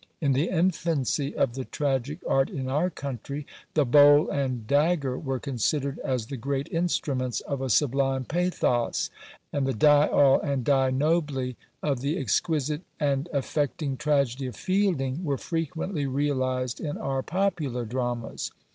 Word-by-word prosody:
In 145 -4 +1
the 145 +6 +1
infancy 165 -6 0
of 130 -4 +2
the 130 +1 -4
tragic 140 +2 -2
art 135 0 +2
in 130 -2 -4
our 150 +7 +1
country, 140 -1 -6 0.3
the 150 -2 +4
bowl 145 +3 +6
and 130 -5 -2
dagger 145 0 +2
were 135 -2 -3
considered 140 +2 -1
as 130 -5 -2
the 135 +3 -6
great 140 +4 -2
instruments 140 -7 0
of 140 -2 -4
a 135 - -2
sublime 135 0 +2
pathos; 165 -8 0 0.4
and 140 -2 0
the 135 - -1
"Die 145 +5 +5
all" 140 -2 +5
and 140 -5 -1
"Die 135 -2 +3
nobly" 140 -2 0 0.3
of 140 -4 0
the 145 +5 -1
exquisite 150 -4 0 0.2
and 140 +2 0
affecting 145 0 -1
tragedy 140 -2 0
of 125 - -7
Fielding 185 -7 0
were 140 -5 0
frequently 165 -1 -2
realised 130 -2 -1
in 150 -2 -3
our 135 -1 -2
popular 160 -9 -1
dramas. 120 0 -3
140 Hz, 145 wpm, -27 LUFS, 130-150 Hz, 0.4 s, bowl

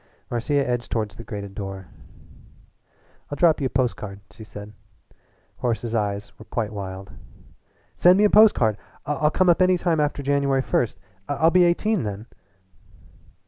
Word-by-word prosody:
Marcia 140 +4 0
edged 120 -1 -3
toward 110 -3 -1
the 115 - -11
grated 100 -4 -7
door. 95 -3 -7 1.4
"I'll 145 - -4
drop 160 -2 +3
you 135 - +1
a - - -7
post 125 -1 0
card," 100 -1 -8
she 110 - -12
said. 105 -1 -10 0.8
Horace's 115 -1 -2
eyes 105 -2 -2
were 110 - -12
quite 110 -2 -3
wild. 95 -1 -7 0.8
"Send 180 +1 +5
me 205 - +3
a 210 - +5
post 215 0 +7
card! 110 -3 +1 0.3
I'll 150 +1 +1
come 185 +4 +1
up 175 +1 +4
any 185 0 +4
time 170 -2 0
after 145 -1 -1
January 140 -1 +1
first. 115 -6 -1 0.3
I'll 160 +3 +2
be 180 0 +5
eighteen 200 +3 +1
then." 105 0 -5
125 Hz, 160 wpm, -23 LUFS, 105-160 Hz, 1.4 s, post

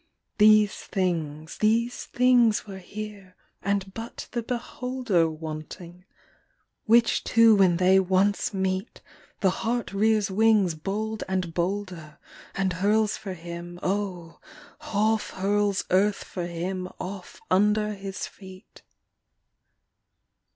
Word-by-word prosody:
These 210 -1 +6
things, 160 -5 -3
these 230 +3 +1
things 245 -3 +3
were 195 -2 -8
here 200 -1 -9 0.3
and 195 -1 -1
but 225 +2 -7
the 240 - -2
beholder 245 -6 -1
Wanting; 160 +3 -8 0.8
which 230 0 +4
two 230 -1 +5
when 185 -4 +4
they 185 +1 +5
once 190 +2 +1
meet, 190 +1 -3 0.4
The 190 -3 +4
heart 235 -2 -2
rears 215 0 +2
wings 210 -3 +3
bold 210 +7 -3
and 185 -3 -2
bolder 180 -3 -3 0.4
And 190 -1 0
hurls 210 +4 +2
for 200 -4 -6
him, 170 +1 -8
O 185 -4 -3 0.4
half 220 -6 0
hurls 205 +1 0
earth 200 +2 +2
for 175 -2 -5
him 180 +2 -4
off 190 0 -7
under 210 +2 +3
his 195 -1 -6
feet. 190 +1 -14
195 Hz, 110 wpm, -26 LUFS, 180-215 Hz, 0.8 s, These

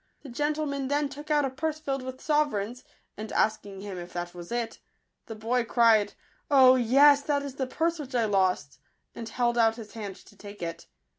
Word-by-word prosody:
The 280 - -9
gentleman 290 +1 -2
then 290 +1 0
took 295 +2 -10
out 295 -2 +3
a 265 - -2
purse 310 +3 -3
filled 275 -3 -3
with 260 0 -7
sovereigns; 255 -7 0 0.3
and 215 +1 -6
asking 205 -3 -1
him 195 -3 -6
if 175 0 -9
that 175 0 -4
was 175 +1 -10
it, 235 -1 -3 0.5
the 225 - -6
boy 230 +3 0
cried, 225 -3 +3 0.2
" - - -37
Oh, 260 -3 +7
yes, 275 +4 +5
that 285 -1 0
is 280 -2 -6
the 265 -1 -3
purse 330 +5 -1
which 270 -3 -7
I 235 -2 +2
lost," 185 -9 0 0.3
and 230 -1 -7
held 240 +1 0
out 225 -1 +4
his 225 -3 -10
hand 205 -4 -6
to - - -18
take 205 -2 -10
it. 165 0 -6
245 Hz, 205 wpm, -27 LUFS, 210-285 Hz, 0.5 s, Oh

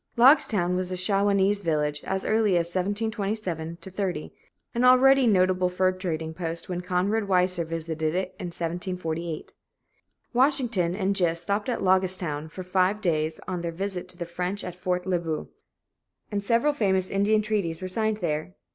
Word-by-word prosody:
Logstown 220 - +5
was 185 0 -2
a 185 - -2
Shawanese 200 +1 +2
village 150 -4 -1
as 190 0 -2
early 215 -4 +3
as 170 0 -1
1727 200 -4 -2
30, 190 0 -4 0.4
and 240 0 0
already 260 +1 +6
a - - +3
notable 185 -3 +3
fur 185 +1 +2
trading 165 -4 -4
post 165 0 -5
when 180 -1 -3
Conrad 190 +4 0
Weiser 180 -2 +2
visited 160 -1 -3
it 185 0 -1
in 180 - -4
1748. 170 -1 -4 0.8
Washington 240 - +2
and 195 0 0
Gist 170 -2 +1
stopped 205 +5 -1
at 240 - -2
"Loggestown" 185 -5 +1
for 185 +3 -7
five 185 +3 +1
days 160 -5 -1
on 180 -2 -3
their 170 -1 -3
visit 185 +1 -4
to 180 - -11
the 175 - -4
French 180 +4 -3
at 180 - -5
Fort 180 0 -2
Le 185 -2 +1
Boeuf, 160 -2 -4 0.8
and 200 -1 -2
several 235 +8 +2
famous 190 -8 +1
Indian 210 +2 +2
treaties 200 -7 -1
were 185 - -4
signed 215 +3 0
there. 165 -1 -3
185 Hz, 165 wpm, -26 LUFS, 170-205 Hz, 0.8 s, already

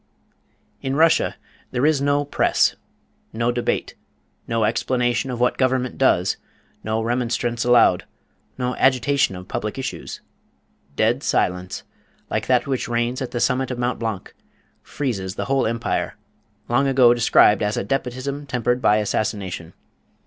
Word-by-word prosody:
In 135 0 -2
Russia 160 +2 +3 0.3
there 130 +2 0
is 155 -3 +3
no 145 +1 +1
press, 145 - +2 0.6
no 115 +2 0
debate, 120 0 -2 0.5
no 115 -1 0
explanation 120 +2 0
of 125 -2 -4
what 125 0 +1
government 130 -1 0
does, 95 -8 +3 0.5
no 110 +1 -1
remonstrance 120 0 -1
allowed, 120 -7 +4 0.5
no 125 0 -1
agitation 130 -3 +2
of 90 0 -9
public 105 +5 -4
issues. 135 - -5 0.8
Dead 115 - +2
silence, 90 -8 -1 0.5
like - - -1
that 125 -2 +3
which 135 -3 -2
reigns 120 +2 -1
at 130 - -3
the 120 - -3
summit 130 +2 +1
of 125 - -4
Mont 120 +1 -1
Blanc, 110 -5 -4 0.5
freezes 95 -10 -4
the - - -3
whole 135 -2 +1
empire, 115 +1 -2 0.5
long 135 +4 +2
ago 130 -3 +5
described 115 -3 +4
as 105 0 0
"a - - -1
despotism 135 +4 -3
tempered 125 0 0
by 105 - +4
assassination." 100 -5 -2
120 Hz, 140 wpm, -22 LUFS, 110-130 Hz, 0.8 s, ago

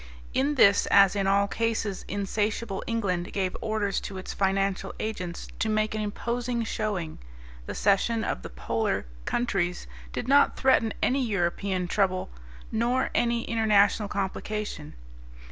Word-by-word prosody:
In 280 +3 +1
this 200 -6 +5
as 195 0 +6
in 195 -1 0
all 200 +1 +3
cases 220 -2 -2
insatiable 205 +1 -2
England 185 -6 -1
gave 190 -2 -1
orders 215 -2 0
to 195 - -7
its 185 - -6
financial 195 0 0
agents 185 -6 -4
to 220 - +1
make 215 0 +1
an 215 - -2
imposing 235 +3 -2
showing. 205 -8 -3 0.5
The - - -5
cession 220 +3 +2
of - - -2
the - - -7
polar - - -1 0.2
countries 195 -7 -1 0.3
did - - -4
not 280 +2 +5
threaten 260 -4 +3
any 265 +1 +2
European 190 -3 -1
trouble 185 - 0 0.4
nor 240 +4 +1
any 235 -1 +1
international 210 -2 +3
complication. 200 -4 -4
205 Hz, 135 wpm, -27 LUFS, 195-230 Hz, 0.5 s, as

